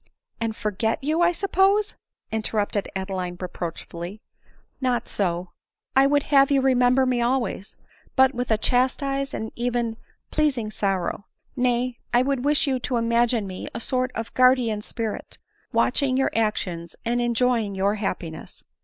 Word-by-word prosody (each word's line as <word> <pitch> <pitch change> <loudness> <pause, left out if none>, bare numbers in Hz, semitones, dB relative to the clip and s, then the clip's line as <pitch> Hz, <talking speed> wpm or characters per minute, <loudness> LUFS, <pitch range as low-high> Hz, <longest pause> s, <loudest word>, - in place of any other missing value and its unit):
" - - -41
And 225 -1 -1
forget 220 +3 -1
you, 310 +4 +1
I 345 0 +5
suppose 395 +3 +2 0.2
?" - - -50
interrupted 210 -2 -1
Adeline 190 -2 -3
reproachfully. 175 +1 -6 0.3
" - - -37
Not 240 -2 0
so; 180 -2 -2 0.4
I 270 +1 +6
would 285 0 +3
have 275 -1 +7
you 280 -1 +4
remember 260 0 +4
me 250 -2 +1
always, 235 -5 -1 0.4
but 265 0 +5
with 245 0 -3
a 220 - +3
chastised 275 +4 0
and 220 0 -4
even 235 -2 -1 0.3
pleasing 265 -8 +1
sorrow; 195 -1 -1 0.3
nay, 245 -1 0 0.2
I 245 - +5
would 270 -2 -1
wish 295 +1 +3
you 265 -3 0
to 250 0 -1
imagine 235 -1 +2
me 185 -1 -6
a - - -2
sort 255 +2 -1
of 225 0 -5
guardian 255 -4 +4
spirit, 225 0 -5 0.3
watching 265 -3 +2
your 270 - +2
actions, 180 -6 -1
and 240 +1 +1
enjoying 240 -3 +1
your 195 +2 +2
happiness." 180 -6 -5
240 Hz, 155 wpm, -24 LUFS, 210-265 Hz, 0.4 s, have